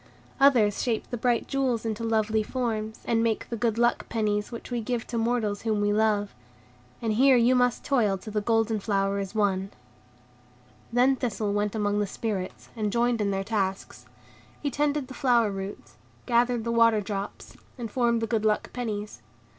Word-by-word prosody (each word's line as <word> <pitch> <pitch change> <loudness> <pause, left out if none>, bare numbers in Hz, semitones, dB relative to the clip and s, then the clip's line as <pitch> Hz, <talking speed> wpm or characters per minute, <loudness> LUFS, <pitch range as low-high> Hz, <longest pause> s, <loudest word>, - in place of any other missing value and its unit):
Others 240 -7 +4
shape 230 -3 -1
the - - -1
bright 240 0 0
jewels 255 -4 0
into 225 0 -3
lovely 220 -1 +1
forms, 220 -2 -3
and 225 -1 +2
make 225 -1 0
the 235 - -3
good 230 -1 0
luck 240 0 +1
pennies 210 -1 -1
which 235 +1 -8
we 240 -1 -1
give 235 +1 -2
to 235 - -4
mortals 225 -3 0
whom 220 -2 0
we 205 0 +2
love. 210 -1 +1 0.7
And 225 -1 +1
here 260 +3 +5
you 240 +2 +4
must 245 -1 +1
toil 220 -8 +2
till 210 +3 -9
the 210 - +1
golden 225 0 +1
flower 195 -1 0
is 195 +1 -5
won." 195 -2 +1 1.2
Then 250 +3 +4
Thistle 215 -4 -2
went 205 +1 -1
among 205 -1 0
the 205 - 0
Spirits, 195 -3 -4
and 210 -2 -1
joined 235 0 +1
in 205 - +1
their 195 0 -1
tasks; 195 -2 -3 0.5
he 285 - -2
tended 290 0 0
the 260 - -9
flower 240 -5 +2
roots, 195 +1 -7 0.3
gathered 240 -1 +2
the 235 - -2
water 230 -2 +4
drops, 200 -1 -6 0.2
and 230 -3 -5
formed 235 -2 +1
the - - +2
good 220 -1 0
luck 215 -1 0
pennies. 210 - -4
225 Hz, 180 wpm, -27 LUFS, 205-240 Hz, 1.2 s, here